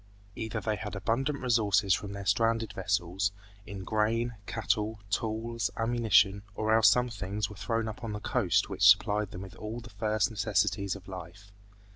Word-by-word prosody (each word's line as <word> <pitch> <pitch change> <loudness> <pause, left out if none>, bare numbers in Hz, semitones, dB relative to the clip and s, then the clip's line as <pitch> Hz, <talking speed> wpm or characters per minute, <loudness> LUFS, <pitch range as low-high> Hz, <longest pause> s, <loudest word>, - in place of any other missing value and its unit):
Either 110 -2 -3
they 110 -1 -1
had 105 -2 -6
abundant 120 +8 0
resources 110 -6 +3
from 100 +1 -2
their 100 0 -6
stranded 115 0 +1
vessels, 95 0 0 0.4
in 95 -1 -7
grain, 115 +4 0
cattle, 110 +1 -1
tools, 115 +2 -1
ammunition, 115 -4 +3
or 110 +1 +1
else 110 -2 +7
some 125 +4 +3
things 105 -2 -3
were - - -9
thrown 115 +3 -1
up 110 +3 -7
on 115 - -3
the 105 - -4
coast 105 - +1
which - - -7
supplied 100 +1 +5
them 95 -3 -8
with 95 - -10
all 110 +2 -5
the 120 0 -12
first 105 +1 0
necessities 100 -2 0
of 95 -1 -12
life. 95 +2 -9
105 Hz, 170 wpm, -29 LUFS, 100-115 Hz, 0.4 s, else